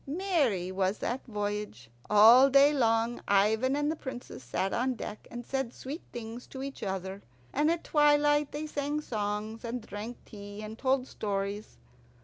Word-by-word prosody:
Merry 280 - 0
was 190 +2 0
that 245 +3 -3
voyage. 205 - -4 0.2
All 230 +6 +8
day 280 +2 +6
long 230 -2 +1
Ivan 220 +7 +3
and 295 +1 +1
the - - -2
Princess 255 - -8
sat 185 +11 -2
on 255 +1 0
deck 215 -2 -7
and 240 0 -7
said 270 -3 -2
sweet 280 +7 -7
things 235 +1 -7
to 265 0 -7
each 275 0 -7
other, 190 0 -4 0.3
and 300 +2 +2
at 335 0 0
twilight 295 -1 +3
they 300 +1 -4
sang 290 0 -2
songs, 215 -3 -3
and 235 -1 -4
drank 215 +4 -6
tea, 205 0 -9
and 215 +1 -7
told 260 +1 +1
stories. 200 -2 -4
235 Hz, 160 wpm, -30 LUFS, 205-275 Hz, 0.3 s, All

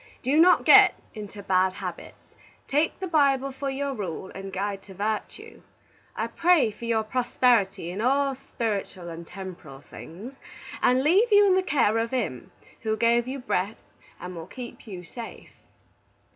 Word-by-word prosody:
Do 265 +3 +1
not 360 +2 +5
git - - +8 0.2
into 205 -2 -9
bad 185 -1 +2
habbits. - - -9 0.3
Take 300 +3 0
the 380 - -3
Bible 275 -4 +2
for 270 +1 -4
your 275 +1 -2
rule 190 -5 -5
and 195 0 -7
guide 195 +1 -3
to 190 - -12
vartue. 210 +2 -4 0.5
I - - -1
pray 335 -9 +3
for 210 +3 -10
your 225 -1 +1
prosperity 215 -6 +1
in 195 +4 -4
all 275 +3 +2
spiritall 205 -8 -4
and 165 0 -10
temporrall 175 -8 -10
things, 200 - -10 0.5
and 255 +1 +3
leave 390 +10 +4
you 410 0 +7
in 385 - +4
the 375 - +3
care 245 - +2
of 230 0 -1
Him 220 - -3 0.3
who 220 -1 -1
gave 235 +2 +2
you 265 +2 -4
breath 215 -5 -2 0.4
and 180 0 -7
will 165 -1 -8
keep 245 -2 -10
you 185 -4 -8
safe. 230 +6 -10
230 Hz, 160 wpm, -26 LUFS, 195-270 Hz, 0.5 s, git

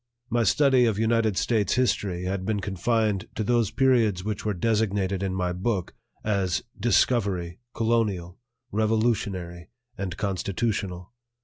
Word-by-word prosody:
My 120 +1 +2
study 130 +3 +4
of 110 -4 +1
United 110 -2 +2
States 110 -4 +1
history 100 -8 0
had 95 +1 -2
been 105 +1 -1
confined 100 +1 0
to 110 - -1
those 115 -1 +2
periods 115 -7 +2
which 105 0 -3
were 105 -2 -1
designated 100 -2 0
in 95 -1 -1
my 90 -1 -1
book 95 0 -2 0.3
as 100 -4 0 0.2
"Discovery," 100 -5 +1 0.2
"Colonial," 105 -6 0 0.3
"Revolutionary," 105 -5 -1 0.3
and 95 -2 -4
"Constitutional." 100 -1 -2
105 Hz, 125 wpm, -26 LUFS, 95-115 Hz, 0.3 s, study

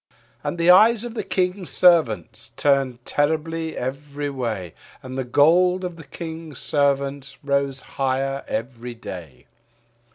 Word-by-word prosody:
And 175 - -3
the 170 +1 +6
eyes 220 +4 +6
of 240 -1 -6
the 230 - -3
King's 185 -1 -1
Servants 155 - +3
turned 135 -4 +1
terribly 160 +2 -1
every 140 +2 -4
way, 110 - -4 0.3
And 130 0 -7
the 130 - -1
gold 175 +8 +4
of 180 -2 -4
the 165 - -11
King's 160 -2 -7
Servants 140 -1 0
rose 140 -1 0
higher 135 +1 -2
every 120 +1 -4
day. 85 - -9
140 Hz, 130 wpm, -23 LUFS, 130-170 Hz, 0.3 s, the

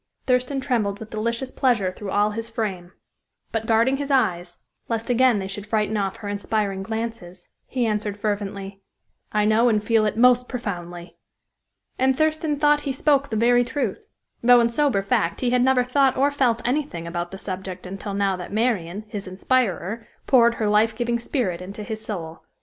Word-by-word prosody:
Thurston 255 +2 +1
trembled 225 -7 -1
with 220 0 -9
delicious 235 +4 -2
pleasure 235 -8 +1
through 195 +2 -8
all 205 +2 +2
his 225 +2 -5
frame; 195 -6 -4 0.6
but, 225 -1 -2
guarding 230 +4 +3
his 285 0 -4
eyes, 180 -10 +1 0.3
lest 230 +1 -1
again 245 -1 +4
they 190 -1 -3
should 200 +1 -6
frighten 215 0 0
off 195 -1 -1
her 225 -3 -8
inspiring 205 -1 -1
glances, 220 -4 -6 0.2
he 250 -2 -1
answered, 210 -2 -1
fervently: 200 -2 -4 0.5
"I 210 -1 +2
know 225 +3 +4
and 210 -2 +1
feel 220 -1 +3
it 210 - -3
most 250 +1 +4
profoundly." 175 -7 -6 0.8
And 260 0 +3
Thurston 310 -1 +1
thought 295 0 +3
he 280 - -2
spoke 280 +1 +2
the 220 - -3
very 245 +2 +4
truth, 245 -4 -3 0.3
though 245 0 +7
in 235 0 +3
sober 255 -6 +1
fact 170 -3 0
he 245 -2 +1
had 250 0 +3
never 255 0 +4
thought 265 +1 +2
or 280 +2 +3
felt 245 -5 +1
anything 255 - -2
about 175 +1 -4
the 195 - -8
subject 185 -1 -6
until 195 +2 -5
now 200 -1 +1
that 180 0 -8
Marian, 210 -4 -1
his 205 -2 -6
inspirer, 215 +1 -1 0.2
poured 235 -3 +5
her 220 - -1
life 215 +2 +3
giving 235 0 -1
spirit 220 - -2
into 200 +3 -6
his 220 0 -6
soul. 165 -7 -6
220 Hz, 180 wpm, -23 LUFS, 195-250 Hz, 0.8 s, though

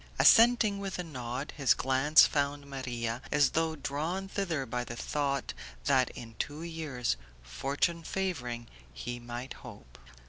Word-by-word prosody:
Assenting 230 -3 +6
with 195 -1 -4
a 180 - -2
nod, 130 -3 -5
his 140 -3 +4
glance 135 +4 +5
found 145 0 -1
Maria, 125 -4 -3
as 145 -2 +4
though 160 0 +1
drawn 155 +7 -3
thither 175 -8 -2
by 125 0 -2
the 115 - -7
thought 140 +1 -1 0.3
that 130 -2 +4
in 115 -1 -9
two 150 +2 -3
years, 155 - -2 0.3
fortune 140 - -1
favouring, 125 -11 -3 0.3
he 120 +1 -5
might 120 +2 -6
hope. 100 - -12
140 Hz, 140 wpm, -31 LUFS, 125-165 Hz, 0.3 s, Assenting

